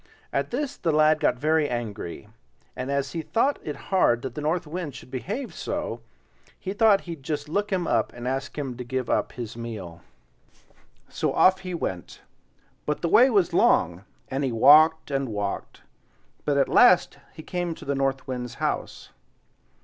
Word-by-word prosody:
At - - 0
this 285 +2 -3
the 165 - 0
lad 155 0 +4
got - - +2
very 155 +2 +2
angry; 110 -5 -5 0.5
and 130 +1 -4
as 140 -1 -1
he 165 - -3
thought 235 - 0
it 150 - -5
hard 125 -11 +1
that 130 -3 -5
the 150 - -5
North 160 +4 0
Wind 155 -3 -5
should 130 - -12
behave 210 - -4
so, - - -4 0.6
he 190 - -4
thought 210 -2 +4
he'd 165 -5 -8
just 150 +1 -4
look 205 +7 -1
him 185 -3 0
up 115 -7 +1
and 120 0 -7
ask 135 +3 -3
him 135 -4 -3
to 125 - -5
give 125 0 -3
up - - 0
his 115 -3 -6
meal. 105 -8 -7 1.1
So - - -2
off 185 0 +5
he 185 -2 -5
went, 95 - -5 0.7
but 150 +3 -2
the 170 - +1
way 255 +9 +6
was 200 -8 +2
long, 85 +3 +3 0.2
and 135 +1 -2
he 130 - 0
walked 150 +7 +6
and 135 -2 -1
walked; 105 -2 -4 0.6
but 145 -1 +1
at 140 - +3
last - - +5
he 160 - -10
came 175 -2 -3
to - - -12
the 140 - 0
North 135 -1 -1
Wind's 125 -2 -5
house. - - -3
145 Hz, 180 wpm, -25 LUFS, 125-170 Hz, 1.1 s, way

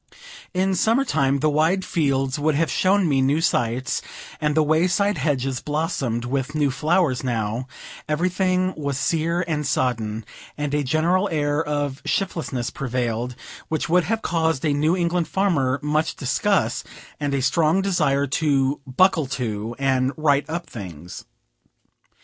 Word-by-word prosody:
In 190 +1 +1
summer 225 +9 +2
time 140 - +1
the 155 - +3
wide 165 +6 +2
fields 135 -3 0
would 150 0 +1
have 165 +2 +1
shown 190 0 +3
me 135 -3 +2
new 140 +4 +2
sights, 125 -6 0 0.4
and 150 -1 +1
the 155 - +4
way 155 +4 +3
side 200 +3 +1
hedges 135 -4 0
blossomed 140 -6 -2
with 135 +4 -2
new 145 -3 +2
flowers; 150 -1 +1
now, 115 0 -2 0.4
everything 185 +3 +1
was 140 -3 -3
sere 165 +4 0
and 150 -3 -1
sodden, 115 -5 -1 0.3
and 145 -1 -2
a 150 0 +1
general 170 +8 +1
air 150 -1 0
of 145 -2 -2
shiftlessness 150 -10 -2
prevailed, 125 -3 -2 0.3
which 155 -1 -2
would 180 +1 +3
have 225 0 -1
caused 160 -3 0
a 150 - +2
New 155 +5 +2
England 175 -1 0
farmer 145 -9 +1
much 155 +2 0
disgust, 195 +9 0 0.4
and 145 -1 -1
a 135 - 0
strong 160 +7 +2
desire 150 -8 +1
to 140 -1 +1
"buckle 160 +2 +3
to," 115 -3 -3
and 130 -1 +1
"right 145 -1 +2
up" 170 +2 -3
things. 90 -6 -9
150 Hz, 150 wpm, -23 LUFS, 130-170 Hz, 0.4 s, the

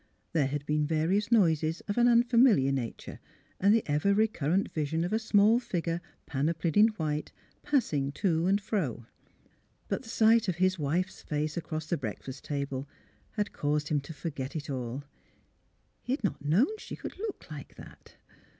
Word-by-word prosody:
There 150 -5 +2
had 145 +1 -3
been 150 0 +1
various 175 +8 +1
noises 165 -7 +3
of 205 - -4
an 240 0 +4
unfamiliar 235 - +5
nature 130 -4 -4 0.4
and 200 +2 +4
the 225 0 +4
ever 150 +7 +2
recurrent 200 -4 +1
vision 160 +1 -1
of 180 - -2
a 220 - +2
small 215 +1 +4
figure, 170 -7 -2 0.2
panoplied 160 +3 -1
in 210 +2 +7
white, 150 -1 -2 0.3
pass 280 - +1
ing 140 -1 0
to 170 -1 +1
and 200 +2 +3
fro. 165 - -2 0.8
But - - -1
the 240 - -12
sight 225 0 +4
of 185 - 0
his 185 +1 +2
wife^s 170 +5 -2
face 150 0 -2
across 160 -2 -4
the 170 +2 -1
breakfast 130 +2 -6
table 140 -1 -3 0.4
had 210 -1 -2
caused 150 0 -1
him 150 - +2
to 140 - -10
for 160 +2 -5
get 135 +2 -6
it 150 -1 -4
all. 130 +1 -4 1.0
He 250 - -2
had 265 - -3
not 195 - -2
known 225 - +2
she - - -7
could - - -8
look 420 - -6
like 145 -3 -9
that. - - -14
165 Hz, 175 wpm, -29 LUFS, 145-205 Hz, 1.0 s, in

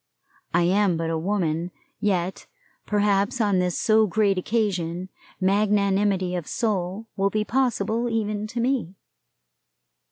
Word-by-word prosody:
I 175 +1 +3
am 190 0 +2
but 165 0 -2
a 165 - 0
woman, 170 -2 -1 0.3
yet 190 -3 -1 0.4
perhaps 205 +2 +1
on 205 -4 +2
this 180 -1 0
so 220 0 +4
great 205 0 +2
occasion 185 -3 -1 0.3
magnanimity 200 -1 +2
of 175 -4 -3
soul 205 -2 -2
will 195 0 +1
be 215 +1 -1
possible 235 -2 0
even 215 -2 -1
to 235 +2 -5
me. 235 -7 0
200 Hz, 125 wpm, -24 LUFS, 180-215 Hz, 0.4 s, so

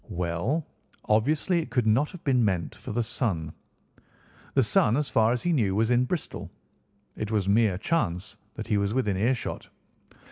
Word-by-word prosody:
"Well, 90 - -1 0.4
obviously 145 - +2
it 145 - -8
could 125 -1 +1
not 115 +7 +3
have 180 - -11
been 130 -4 +3
meant 95 -5 0
for - - -8
the 120 +3 0
son. 110 - -2 1.0
The - - +5
son, 115 +5 +3
as 145 -2 -1
far 110 -2 +3
as 125 - -1
he 175 - +2
knew, 105 -10 +1
was 110 +3 +2
in 125 +1 +4
Bristol. 170 +3 -4 0.7
It 105 - -4
was 105 -3 0
mere 105 -2 +3
chance 100 - -1 0.2
that - - -5
he 105 - +1
was 100 +3 -1
within 105 -7 +1
earshot. 120 +6 -1
115 Hz, 175 wpm, -27 LUFS, 100-130 Hz, 1.0 s, The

